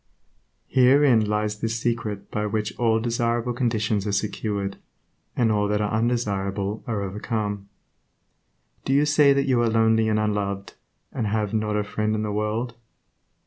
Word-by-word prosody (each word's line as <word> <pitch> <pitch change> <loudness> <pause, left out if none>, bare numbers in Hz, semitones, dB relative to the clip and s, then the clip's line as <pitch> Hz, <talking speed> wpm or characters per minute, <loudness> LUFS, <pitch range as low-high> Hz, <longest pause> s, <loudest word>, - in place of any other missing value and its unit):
Herein 130 -2 +4
lies 105 0 -1
the 115 - -1
secret 115 -3 -3
by 105 0 -1
which 105 0 -2
all 115 -2 +3
desirable 120 +1 -1
conditions 110 -4 0
are - - 0
secured, 100 -1 -2 0.6
and 115 -3 +2
all 105 -1 +1
that 105 0 0
are 105 0 -1
undesirable 105 -3 -1
are 110 -4 -2
overcome. 105 0 -3 1.1
Do 135 - 0
you 145 +2 +4
say 150 -1 +5
that 140 0 +2
you 130 -3 +2
are 115 - +2
lonely 110 0 +3
and 110 - +1
unloved, 100 -2 -2 0.4
and 115 -5 -2
have 105 0 -1
"not 105 -1 0
a 105 - +1
friend 110 +1 -1
in 110 - -1
the 105 - -2
world"? 105 +3 -2
110 Hz, 155 wpm, -24 LUFS, 105-115 Hz, 1.1 s, say